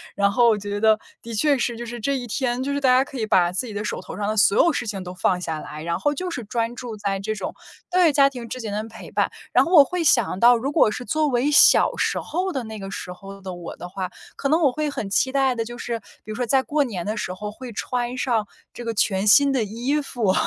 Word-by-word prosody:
然 200 0 +2
后 240 +2 +4
我 220 - +4
觉 205 0 -4
得 220 0 +4 0.2
的 230 - -7
确 285 +7 +3
是， 240 -1 -1
就 240 - -6
是 240 +1 -6
这 275 +5 0
一 245 - -5
天 245 +2 -1
就 280 - -2
是 285 - -1
大 260 - +3
家 260 - +4
可 275 -2 -8
以 220 - 0
把 175 -4 +3
自 195 +7 -2
己 215 - -7
的 205 - -3
手 - - -3
头 - - -9
上 205 - -2
的 215 - -1
所 200 - +4
有 340 - +4
事 - - -2
情 195 -3 -4
都 180 - -7
放 180 0 0
下 160 -3 -3
来， 150 +1 -8
然 170 +1 -2
后 290 - +1
就 365 +4 -3
是 245 - -4
专 230 +1 -2
注 235 -3 -7
在 200 -1 -2
这 215 +2 -3
种 210 - -5 0.4
对， 355 -3 +4
家 275 -1 +5
庭 240 -3 -8
之 255 - -5
间 220 -3 -5
的 210 - -2
陪 225 - -11
伴。 - - 0 0.2
然 - - +5
后 340 - -4
我 295 - +10
会 350 +4 -3
想 240 -10 +2
到 240 +2 +6
如 265 +5 -2
果 295 -7 +4
是 245 - -6
作 310 +1 +1
为 270 +2 +1
小 295 - +6
时 - - 0
候 370 +3 -2
的 265 -5 -3
那 220 -1 -8
个 195 - -7
时 180 - -6
候 195 +2 -11
的 190 -1 -6
我 175 -1 -8
的 175 - -7
话， 185 0 -4 0.3
可 275 - -2
能 320 +3 +3
我 285 -5 +4
会 305 +3 -2
很 215 -8 -4
期 260 +6 +1
待 270 -2 +2
的 230 - -1
就 240 +1 -8
是， 235 -1 -4 0.2
比 215 - -8
如 - - -5
说 245 +1 -1
在 265 +3 +3
过 295 +1 +1
年 200 -10 -5
的 215 +2 -2
时 185 - -3
候 210 +3 -6
会 250 +3 -9
穿 245 +2 -3
上 230 -5 0 0.3
这 240 - -8
个 230 - -2
全 195 -2 +1
新 280 +6 +6
的 260 -4 +1
衣 245 +8 -1
服， 230 -8 0
235 Hz, 305 characters per minute, -23 LUFS, 205-270 Hz, 0.4 s, 我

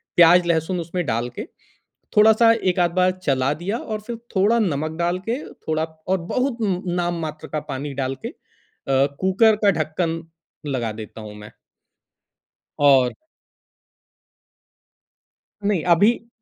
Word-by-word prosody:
प्याज़, 175 +1 +7
लहसुन 170 +2 0
उसमें 170 +1 -3
डाल 120 -1 -1
के, - - -4 0.7
थोड़ा-सा 220 +2 +6 0.2
एक-आध 175 -1 +1
बार 185 0 +4
चला 135 0 +1
दिया 205 +6 -2
और 215 -2 -5
फिर 235 - -4 0.2
थोड़ा 205 +5 +4
नमक 160 -6 -1
डाल 175 +1 0
के, 240 - 0 0.2
थोड़ा 155 0 -2
और 160 +4 -3
बहुत 255 -1 0
उम 200 -4 +1
उम, 180 - -8
नाम 175 -1 -1
मात्र 155 0 -8
का 155 - -3
पानी 140 +1 -5
डाल 130 +1 -2
के - - -2
अ, 135 0 -3
कुकर 210 +4 +4
का 200 - +7
ढक्कन 165 +1 -2 0.5
लगा 115 -3 -2
देता 110 - -11
हूँ 105 -1 -9
मैं। 105 0 -12 1.3
और 135 -3 +5 2.5
नहीं, 200 -6 +1
अभी 205 +7 +3
170 Hz, 140 wpm, -22 LUFS, 145-200 Hz, 2.5 s, प्याज़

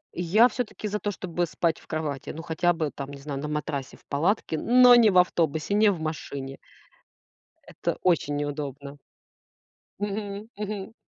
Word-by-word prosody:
Я 190 +8 +4
всё-таки 225 -3 -4
за 210 +1 -2
то, 205 - -2
чтобы 175 -3 -2
спать 165 0 0
в - - -20
кровати. 155 -4 -4
Ну, 165 - -6
хотя 170 +1 +1
бы, 160 -4 -2
там, 140 0 -6
не 140 -1 -9
знаю, 140 -1 -5
на 150 - -4
матрасе 150 -3 -4
в - - -25
палатке, 160 +2 0
но 250 +4 +7
не 230 -3 +6
в 185 - +4
автобусе, 165 -1 +2
не 210 0 +5
в 180 - -3
машине. 140 -4 -5 1.1
Это - - -3
очень 165 -5 +2
неудобно. 145 -1 -5 1.0
Мгм, 205 +1 -4
мгм. 210 0 -5
165 Hz, 165 wpm, -26 LUFS, 145-205 Hz, 1.1 s, но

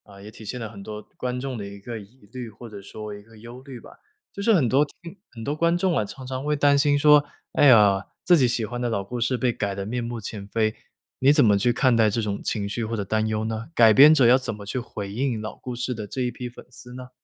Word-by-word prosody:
啊， 100 - -14
也 105 - -10
体 110 - -13
现 115 +4 -5
了 115 - -5
很 105 -2 -11
多 105 +1 -7 0.2
观 125 0 -3
众 130 -2 -5
的 100 - -5
一 100 0 -10
个 115 +2 -7
疑 105 +2 -17
虑， 125 -2 -6
或 115 +3 -12
者 105 -3 -10
说 105 +2 -8
一 105 - -10
个 110 +1 -19
忧 120 +3 -11
虑 130 -2 -10
吧， - - -14 0.4
就 200 - -6
是 225 - +3
很 145 -9 +3
多 135 +5 +3
听 170 +5 -11
很 115 - -9
多 145 +5 -2
观 170 +2 +2
众 180 -1 +1
啊， - - +1
常 130 +5 -9
常 130 +1 -5
会 150 +1 0
担 145 -1 +3
心 145 0 +3
说， 150 0 +6 0.3
哎 145 - +4
呀， 105 -6 +5 0.2
自 180 - +5
己 135 -6 +4
喜 120 -2 -1
欢 120 +2 -6
的 120 - -1
老 100 -4 -2
故 120 +5 -6
事 125 +2 +1
被 125 -1 0
改 100 -3 -3
得 100 0 -5
面 120 +3 -3
目 120 0 -5
全 100 -1 -7
非。 110 +1 0 0.5
你 135 +2 +5
怎 145 -3 +5
么 105 -2 +4
去 100 +5 +2
看 125 0 +2
待 110 -2 +4
这 105 - -2
种 105 -2 -3
情 100 -2 -2
绪 115 +3 -3
或 115 +1 -3
者 100 - -2
担 110 +2 -1
忧 110 0 -2
呢？ 110 +1 -4
改 115 -2 +6
编 145 +7 +8
者 145 -5 +5
要 125 +3 +6
怎 125 -4 -3
么 105 -1 -10
去 125 +6 -3
回 100 -4 -7
应 125 0 -1
老 110 0 -6
故 125 -1 -7
事 125 +1 -3
的 110 -3 -7
这 130 - -5
一 125 -1 -1
批 125 +1 -7
粉 120 - -14
丝 125 0 -12
呢？ 125 0 -9
120 Hz, 310 characters per minute, -24 LUFS, 105-130 Hz, 0.5 s, 编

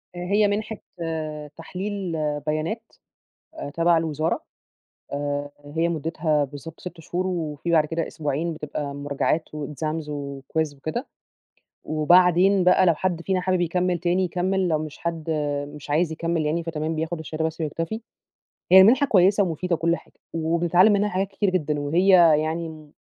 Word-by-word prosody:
هي 200 +4 +2
مِنحة 215 +2 -2 0.8
تحليل 190 +2 -4 0.4
بيانات 155 +9 -1 0.7
أ 230 - -6
تبع 165 +2 +3
الوزارة 160 0 -1 0.7
آآ، 145 0 -2
هي 160 +4 -1
مُدِّتها 160 -2 0
بالضبط 145 +4 -10
6 175 -2 -8
شهور، 180 +3 -3
وفي 165 -3 -3
بعد 160 -2 +4
كده 165 +2 -2
أسبوعين 155 +2 -2
بتبقى 145 -2 -5
مراجعات 145 +3 -1
وexams 155 +2 -3
وquiz 145 +1 -3
وكده، 155 - -4 0.8
وبعدين 180 +4 +4
بقى 180 +1 +5
لو 170 - +5
حد 170 +1 -2
فينا 185 +1 0
حابب 185 0 0
يكمِّل 180 +1 +1
تاني، 180 +2 +1
يكمِّل، 185 +1 0
لو 155 -2 +2
مش 155 -1 -6
حد، 170 -2 -3 0.5
مش 150 -1 -10
عايز 160 +2 +2
يكمِّل 165 -1 -1
يعني 165 +3 0
فتمام 160 -1 -3
بياخد 160 +2 -3
الشهادة 160 0 -4
بس 160 +1 -3
ويكتفي. 165 +7 -3 0.7
هي 190 - +11
المنحة 255 +9 +6
كويِّسة 195 -1 +4
ومفيدة 180 0 -1
وكل 170 +1 +1
حاجة - - -18 0.2
وبنتعلِّم 170 +4 +3
منها 205 +1 +2
حاجات 195 0 -1
كتيرة 195 0 0
جدًا 150 -5 -1
وهي 165 +7 +1 0.3
يعني، 160 -1 -5
165 Hz, 145 wpm, -24 LUFS, 155-180 Hz, 0.8 s, هي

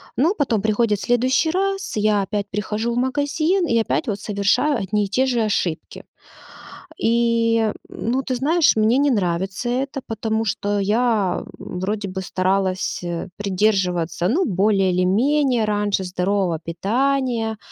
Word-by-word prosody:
Но 320 +10 +2
потом 240 -8 0
приходит 215 -1 +1
следующий 255 - +2
раз, 390 - -2
я 210 -1 +2
опять 200 +1 -3
прихожу 210 +3 -2
в - - -3
магазин 300 +7 0
и 230 - +2
опять 270 +6 -1
вот 200 -2 -3
совершаю 210 +8 +1
одни 205 +1 -1
и - - -7
те 255 +7 +2
же 245 -3 0
ошибки. 190 -6 -2 0.9
И, 230 -1 +2 0.2
ну, 255 +4 -2
ты 255 - -2
знаешь, 310 +6 +3
мне 220 +3 +3
не 285 0 +3
нравится 190 +2 -1
это, 270 +3 -2
потому 225 0 -2
что 205 0 -1
я 210 -1 +1 0.2
вроде 200 +3 -4
бы 190 +1 -4
старалась, 185 0 -1
э, 175 +1 -4
придерживаться, 180 -4 0
ну, 340 - +2
более 195 -1 +2
или 180 +1 +1
менее, 250 +4 +2
раньше, 205 -2 0
здорового 180 -1 0
питания, 225 +6 -1
215 Hz, 140 wpm, -21 LUFS, 195-250 Hz, 0.9 s, знаешь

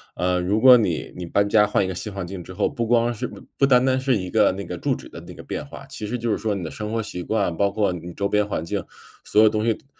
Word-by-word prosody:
呃， 90 0 0
如 95 +4 0
果 125 -1 +9
你 90 -8 -1
你 90 - -5
搬 100 +4 +1
家 105 -1 +5
换 105 - +1
一 - - -1
个 - - -3
新 105 +4 -5
环 95 -3 -4
境 90 0 -7
之 95 - -10
后， 100 - 0
不 120 -6 -3
光 120 0 +2
是 105 - -4
不 - - -12 0.2
不 135 - +4
单 125 -2 +5
单 130 0 +2
是 130 -2 +1
一 90 -3 -3
个 105 -3 +3
那 100 +1 -5
个 - - -6
住 - - 0
址 - - -11
的 - - -10
那 - - -9
个 - - -11
变 - - -5
化， - - -11
其 105 - -6
实 125 +3 -2
就 115 -1 -2
是 - - +1
说 105 -2 -1
你 95 - -4
的 80 - -5
生 105 +1 -5
活 115 -1 -1
习 90 -3 -6
惯， 100 -4 -1
包 100 0 +2
括 100 -3 +1
你 85 0 -7
周 100 0 -2
边 105 0 +1
环 80 - -3
境， 85 - -3 0.4
所 105 +1 +4
有 110 - +7
东 110 +1 -1
西 115 - +3
都 - - -16
105 Hz, 340 characters per minute, -23 LUFS, 90-115 Hz, 0.4 s, 果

